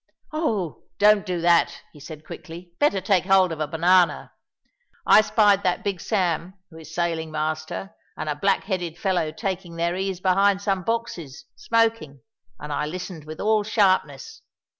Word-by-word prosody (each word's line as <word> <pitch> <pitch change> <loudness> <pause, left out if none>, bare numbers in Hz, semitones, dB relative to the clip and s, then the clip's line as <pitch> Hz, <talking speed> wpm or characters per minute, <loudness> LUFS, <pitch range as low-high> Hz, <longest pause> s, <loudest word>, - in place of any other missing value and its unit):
"Oh, 220 - -2
don't 210 -1 +4
do 180 -2 -2
that!" 170 0 +2
he 150 - -14
said 155 +1 -10
quickly; 175 +1 -10
"better 290 -10 +2
take 190 -1 +1
hold 190 -2 +4
of 160 - -5
a 155 - -1
banana. 175 +3 +2 0.7
I 215 - +7
spied 210 -2 +3
that 180 -3 -1
Big 195 -4 -3
Sam, 185 -3 -1 0.2
who 160 - -12
is 160 0 -12
sailing 165 -2 -1
master, 155 +4 -4 0.2
and - - -5
a 150 - 0
black 195 +7 +1
headed 175 -4 -3
fellow 180 -6 0
taking 185 -3 -5
their 170 +1 -1
ease 190 -1 -3
behind 195 +1 +3
some 195 -2 -1
boxes, 180 - -4
smoking, 225 - 0 0.4
and 150 0 -6
I 150 +1 -1
listened 175 -1 -7
with 155 0 -9
all 215 0 +2
sharpness. 190 - 0
180 Hz, 160 wpm, -24 LUFS, 160-200 Hz, 0.7 s, I